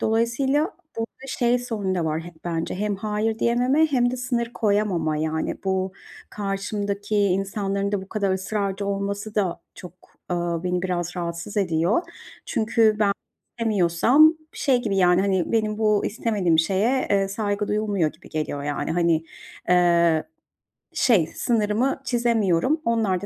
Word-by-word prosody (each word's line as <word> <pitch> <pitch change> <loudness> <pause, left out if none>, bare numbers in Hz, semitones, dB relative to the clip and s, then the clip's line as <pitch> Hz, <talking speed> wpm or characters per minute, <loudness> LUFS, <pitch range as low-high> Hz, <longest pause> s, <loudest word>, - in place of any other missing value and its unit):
Dolayısıyla 265 - +1 0.2
burada 230 +4 -6
şey 245 -1 +1
sorunu 215 -6 -2
da 175 - -1
var 155 0 -1
hep 170 0 -13
bence 165 -1 -2
hem 205 +1 -1
"hayır" 215 +2 -1
diyememe 250 +7 +3
hem 245 -5 +2
de 255 - -3
sınır 240 -1 -2
koyamama. 200 -7 +1
Yani, 160 +1 -1
bu 190 0 0 0.4
karşımdaki 205 +1 -3
insanların 200 0 0
da 200 -2 -1
bu 190 - -12
kadar 200 -3 0
ısrarcı 195 +1 -2
olması 200 +1 -3
da 190 -5 0
çok, 180 -3 -10 0.4
ııı, 175 -1 -1
beni 180 0 -1
biraz 175 -1 -2
rahatsız 170 +3 -5
ediyor. 175 - +2 0.4
Çünkü 220 -1 +2
ben 205 -2 +3 0.5
istemiyorsam 225 - +4 0.2
şey 255 -4 +1
gibi, 200 -4 -1
yani, 180 -1 +4
hani, 190 -2 0
benim 215 -2 0
bu 210 -2 +2
istemediğim 205 -7 0
şeye, 200 +10 +2
eee, 195 -1 +2
saygı 205 0 -2
duyulmuyor 205 -7 0
gibi 160 - -17
geliyor; 155 -2 -3
yani, 145 +1 -3
hani, 170 -2 +2 0.4
eee, 170 -2 +4 0.7
şey 215 -12 +3
sınırımı 230 +4 0
çizemiyorum. 235 - +1
Onlar 220 -6 +1
da - - -5
200 Hz, 140 wpm, -24 LUFS, 180-225 Hz, 0.7 s, istemiyorsam